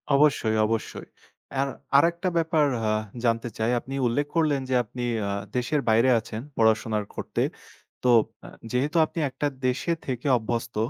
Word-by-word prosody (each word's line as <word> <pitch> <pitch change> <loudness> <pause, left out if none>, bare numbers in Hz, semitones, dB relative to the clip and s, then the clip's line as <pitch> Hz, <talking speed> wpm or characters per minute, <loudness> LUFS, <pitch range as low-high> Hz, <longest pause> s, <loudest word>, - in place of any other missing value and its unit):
অবশ্যই, 140 -7 +3
অবশ্যই। 115 0 -3 0.5
আর 140 - +2 0.3
আরেকটা 170 +4 +2
ব্যাপার 160 -2 +2 0.2
আ - - +2 0.3
জানতে 115 +1 +1
চাই 110 +2 +1
আপনি 135 +3 -9
উল্লেখ 145 +5 0
করলেন 150 -4 +2
যে 130 - +2
আপনি 120 +3 -7 0.3
আ - - -1 0.3
দেশের 130 +4 0
বাইরে 115 +4 +4
আছেন 110 0 -7 0.2
পড়াশোনা 110 -1 +2 0.2
করতে। - - -3 0.6
তো 125 - +3 0.4
আ - - -9 0.2
যেহেতু 145 +7 0
আপনি 165 - -6
একটা 135 +3 -2 0.2
দেশে 125 +7 0
থেকে 130 +1 -3
অভ্যস্ত 115 +1 -3
125 Hz, 150 wpm, -26 LUFS, 115-145 Hz, 0.6 s, বাইরে